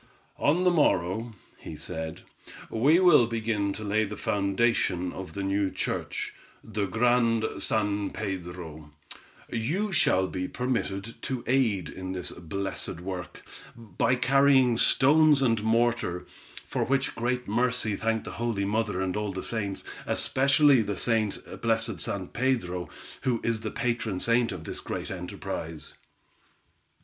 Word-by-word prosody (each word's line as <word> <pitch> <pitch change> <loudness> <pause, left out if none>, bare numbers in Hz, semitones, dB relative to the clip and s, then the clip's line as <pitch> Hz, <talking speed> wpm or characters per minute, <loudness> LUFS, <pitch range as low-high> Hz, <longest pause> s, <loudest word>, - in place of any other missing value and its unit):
"On 165 +6 +3
the 180 - +5
morrow," 115 - +1 0.3
he - - -8
said, 80 0 -5 0.5
"we 140 +10 +4
will 170 -10 +6
begin 110 -3 -1
to 110 - -5
lay 105 +1 +1
the 105 -1 -5
foundation 100 -3 +1
of 95 -4 -7
the 100 - -3
new 100 0 +1
church, - - -3 0.3
the 105 -2 -2
Grand 115 +1 +2
San 105 -2 0
Pedro; 85 -5 -6 0.6
you 165 - -1
shall 95 - +3
be 90 0 -3
permitted 115 -4 -3
to 130 -3 -3
aid 115 - +2
in 95 +2 -6
the 90 -2 -3
blessed 95 0 -4
work, 90 0 -6 0.3
by 115 +2 0
carrying 130 0 +4
stones 150 +5 +5
and 115 -5 +2
mortar, 115 -5 +1 0.4
for - - -1
which 135 0 0
great 125 +2 -2
mercy 120 -1 +1
thank 110 +1 -1
the - - -7
holy 115 -4 -1
Mother 105 -2 0
and 95 -1 -2
all 105 -1 -2
the 95 0 -5
saints, 100 -4 -2 0.2
especially 140 -1 +4
the 110 +1 -1
blessed 115 -5 0
San 100 -5 -3
Pedro, 115 -9 -1 0.3
who 120 -3 0
is 115 -2 0
the 110 - -3
patron 115 -6 -2
saint 120 +2 +3
of 90 -4 -6
this - - -5
great - - -5
enterprise." 80 -1 -5
110 Hz, 135 wpm, -27 LUFS, 95-125 Hz, 0.6 s, will